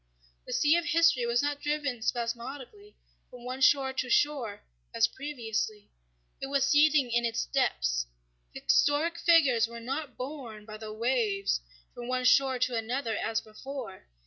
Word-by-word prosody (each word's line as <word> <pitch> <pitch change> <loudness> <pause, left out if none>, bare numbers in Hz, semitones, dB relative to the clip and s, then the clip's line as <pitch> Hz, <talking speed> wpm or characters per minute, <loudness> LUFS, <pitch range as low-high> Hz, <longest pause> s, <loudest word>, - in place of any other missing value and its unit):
The - - -4
sea 300 +2 +4
of 345 - -1
history 330 -8 +3
was 235 +3 +1
not 290 0 -2
driven 295 -5 -2
spasmodically 250 - -4 0.3
from 250 +1 -7
shore 265 0 +4
to 255 -1 -3
shore 250 -7 +1 0.3
as - - +5
previously. 225 -7 -4 0.5
It 270 - -3
was 275 -1 +1
seething 290 -2 +4
in 240 0 +2
its 230 -1 -1
depths. - - 0 0.4
Historic 305 - +1
figures 275 -10 +4
were 235 0 -9
not 270 +3 -5
borne 250 -6 -7
by 215 0 -9
the 215 0 -8
waves 215 - 0 0.3
from 240 0 -8
one 255 0 -1
shore 265 0 +4
to 250 0 0
another 230 +1 -2
as 225 +1 -1
before. 225 -2 -9
255 Hz, 145 wpm, -29 LUFS, 230-285 Hz, 0.5 s, as